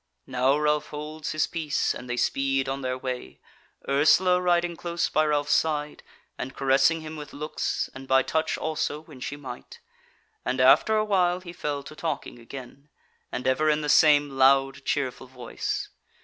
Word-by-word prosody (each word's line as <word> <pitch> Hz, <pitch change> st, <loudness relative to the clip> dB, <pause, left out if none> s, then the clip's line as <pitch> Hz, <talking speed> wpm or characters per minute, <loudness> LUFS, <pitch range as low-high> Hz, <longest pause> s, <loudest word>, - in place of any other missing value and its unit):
Now 130 Hz, +3 st, +2 dB
Ralph 150 Hz, 0 st, +1 dB
holds 150 Hz, +1 st, -6 dB
his 155 Hz, -, +1 dB
peace, 155 Hz, -4 st, -1 dB
and 125 Hz, -, -9 dB
they 120 Hz, -, -2 dB
speed 135 Hz, +1 st, +1 dB
on 135 Hz, +1 st, -3 dB
their 130 Hz, -1 st, -2 dB
way, 130 Hz, -1 st, -6 dB, 0.5 s
Ursula 180 Hz, +6 st, +4 dB
riding 175 Hz, -1 st, +1 dB
close 170 Hz, 0 st, -2 dB
by 155 Hz, -, +2 dB
Ralph's 145 Hz, -1 st, 0 dB
side, 150 Hz, -2 st, 0 dB, 0.4 s
and 130 Hz, -, -5 dB
caressing 140 Hz, +4 st, +3 dB
him 155 Hz, 0 st, -7 dB
with 150 Hz, -1 st, -9 dB
looks, 150 Hz, +2 st, -2 dB
and 135 Hz, 0 st, -10 dB
by 130 Hz, 0 st, +4 dB
touch 160 Hz, 0 st, -1 dB
also 155 Hz, -1 st, -2 dB
when 155 Hz, -4 st, -14 dB
she 140 Hz, -, -5 dB
might; 130 Hz, -4 st, -10 dB, 0.6 s
and 130 Hz, +1 st, -2 dB
after 135 Hz, +12 st, +5 dB
a 215 Hz, -, +2 dB
while 180 Hz, -3 st, +2 dB
he 175 Hz, -2 st, -9 dB
fell 145 Hz, -4 st, -3 dB
to 150 Hz, -, -11 dB
talking 155 Hz, -6 st, -4 dB
again, 135 Hz, +4 st, -11 dB, 0.4 s
and 125 Hz, -, -4 dB
ever 140 Hz, +4 st, +2 dB
in 150 Hz, 0 st, +2 dB
the 150 Hz, -, -3 dB
same 145 Hz, 0 st, +6 dB
loud, 135 Hz, 0 st, +3 dB
cheerful 130 Hz, -2 st, -2 dB
voice. 125 Hz, -2 st, -4 dB
145 Hz, 170 wpm, -26 LUFS, 135-155 Hz, 0.6 s, same